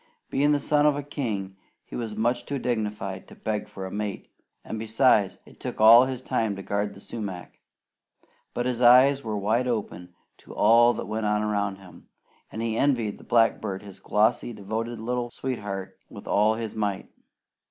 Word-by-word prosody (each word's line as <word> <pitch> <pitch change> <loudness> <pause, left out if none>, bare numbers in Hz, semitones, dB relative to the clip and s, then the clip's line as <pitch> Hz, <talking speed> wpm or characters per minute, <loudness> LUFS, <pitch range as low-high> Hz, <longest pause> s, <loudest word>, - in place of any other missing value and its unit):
Being 145 +2 +2
the 145 - +3
son 150 +1 +3
of 150 - +3
a 145 - -4
king, 105 -10 -4 0.3
he - - -10
was 115 -3 -4
much 120 +2 0
too 140 - -2
dignified 105 -6 -3
to - - -14
beg 105 -1 -3
for 95 - -7
a 95 - -7
mate, 105 -1 -5 0.3
and 110 - -5
besides, 110 -2 +2
it - - -18
took - - -6
all 115 +3 +9
his 130 -1 -5
time 110 -5 -1
to 95 - -8
guard 100 +1 -2
the - - -12
sumac; 100 -5 -7 1.0
but 120 - -1
his 125 -1 -1
eyes 130 +3 +6
were 110 -2 -3
wide 110 +5 +1
open 90 -7 -4 0.2
to - - -13
all 120 +1 +5
that - - -5
went 110 0 -2
on 105 0 +1
around 100 -2 -1
him, 95 -2 -16 0.4
and 110 - -4
he 115 -1 -1
envied 120 -6 0
the - - -14
blackbird 110 -4 +1
his 100 -2 -12
glossy, 115 +3 +1
devoted 110 +3 -4
little 120 +2 -3
sweetheart, 100 -7 -5
with - - -11
all 105 +2 +3
his 110 -1 -5
might. 105 -3 -2
110 Hz, 185 wpm, -26 LUFS, 100-120 Hz, 1.0 s, all